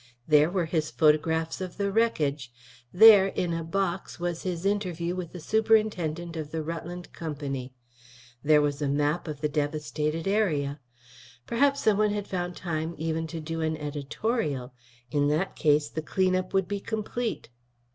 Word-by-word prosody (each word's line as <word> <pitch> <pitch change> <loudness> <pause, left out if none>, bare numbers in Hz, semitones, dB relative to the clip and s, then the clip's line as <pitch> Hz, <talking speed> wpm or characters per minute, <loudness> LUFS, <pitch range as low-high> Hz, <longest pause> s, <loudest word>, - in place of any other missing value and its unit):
There 150 0 +5
were 180 -1 0
his 155 -1 -1
photographs 160 +2 +2
of 185 -1 -6
the 200 -1 0
wreckage; 150 - 0 0.4
there, 205 0 +8
in 180 -3 -2
a 165 0 -2
"box" 190 +2 -2
was 175 -1 -2
his 180 -1 -3
interview 180 -4 -1
with 180 -2 -5
the 180 - -8
superintendent 185 -5 +1
of 155 -2 -5
the 160 0 -3
Rutland 170 +2 -6
Company; 140 -5 -5 0.7
there 150 +1 +4
was 145 0 -1
a 145 - +1
map 145 +5 0
of 150 -2 -6
the 150 - +2
devastated 150 +2 -2
area. 155 -9 +1 0.7
Perhaps 280 +4 +2
someone 215 0 +3
had 205 -1 -3
found 180 -1 -3
time 160 -1 -3
even 160 +1 -2
to 165 0 -6
do 165 +1 -4
an 160 0 -1
editorial; 145 - -3 0.4
in 145 0 +2
that 155 +6 0
case 150 -1 +3
the 160 - -4
clean 185 +3 +1
up 185 0 -2
would 190 -2 +1
be 205 0 -2
complete. 220 - -3
165 Hz, 160 wpm, -27 LUFS, 150-190 Hz, 0.7 s, there